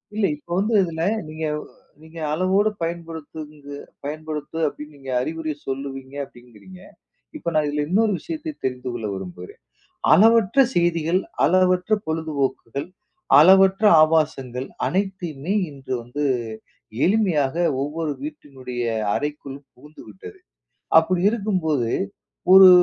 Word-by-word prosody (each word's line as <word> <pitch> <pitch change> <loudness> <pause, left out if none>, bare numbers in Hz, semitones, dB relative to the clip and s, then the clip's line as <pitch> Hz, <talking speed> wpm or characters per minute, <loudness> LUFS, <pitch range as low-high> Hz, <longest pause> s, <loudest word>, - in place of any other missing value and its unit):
இல்ல. 215 -2 +2
இப்ப 160 - -29
வந்து 210 +4 0
இதுல 165 -2 -4 0.3
நீங்க 155 +1 -4
வ் - - -10 0.3
நீங்க 160 +1 -12
அளவோடு 190 +5 +2
பயன்படுத்துங்க 160 -3 -6 0.3
பயன்படுத்து 150 +1 -5
அப்டின்னு 150 +1 -8
நீங்க 135 -1 -7
அறிவுரை 155 +3 -3
சொல்லுவீங்க 135 0 -5
அப்டிங்கிறீங்க. 125 - -16 0.6
இப்ப 170 - -3
நான் 155 -1 +3
இதுல 145 0 -1
இன்னொரு 215 +4 +3
விஷயத்தை 315 -1 -5
தெரிந்து 125 -1 -3
கொள்ள 115 -3 -4
விரும்புகிறேன். 90 -2 -9 0.5
அளவற்ற 225 - +5 0.2
செய்திகள், 170 0 +2 0.2
அளவற்ற 185 +3 +3
பொழுதுபோக்குகள், 145 -4 -2 0.5
அளவற்ற 190 +5 +6 0.2
ஆபாசங்கள் 135 -5 0 0.2
அனைத்தையுமே 185 -4 -2 0.2
இன்று 135 -2 -8
வந்து 135 +5 -4 0.8
எளிமையாக, 175 -9 +2 0.3
ஒவ்வொரு 155 +2 -3
வீட்டினுடைய 135 -5 -7 0.3
அறைக்குள் 145 -2 -4 0.2
புகுந்துவிட்டது. 110 - -13 0.6
அப்டி 175 +2 +1
இருக்கும்போது, 180 - 0 0.6
ஒரு 190 0 +10
155 Hz, 105 wpm, -22 LUFS, 140-185 Hz, 0.8 s, ஒரு